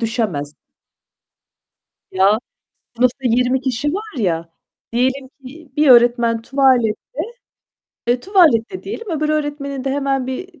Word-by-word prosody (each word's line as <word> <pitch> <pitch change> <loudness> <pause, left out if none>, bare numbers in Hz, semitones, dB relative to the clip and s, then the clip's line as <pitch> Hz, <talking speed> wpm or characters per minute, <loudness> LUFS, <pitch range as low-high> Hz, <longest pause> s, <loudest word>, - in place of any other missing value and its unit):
düşemez. 205 - -2 1.5
Ya, 195 +3 +3 0.6
sınıfta 250 +2 +2
20 250 +2 +2
kişi 265 +4 -1
var 425 -7 -6
ya, 170 -6 -1 0.4
diyelim 260 +2 0
ki 275 +2 -14
bir 300 -1 +3
öğretmen 235 -1 +4
tuvalette, 255 -5 +3 1.1
eee, 245 +1 +1
tuvalette 355 - +3
diyelim, 430 0 -6
öbür 305 -1 -1
öğretmenin 290 -3 -2
de 270 - -1
hemen 270 -2 -1
bir 325 +5 -7
260 Hz, 115 wpm, -19 LUFS, 230-290 Hz, 1.5 s, öğretmen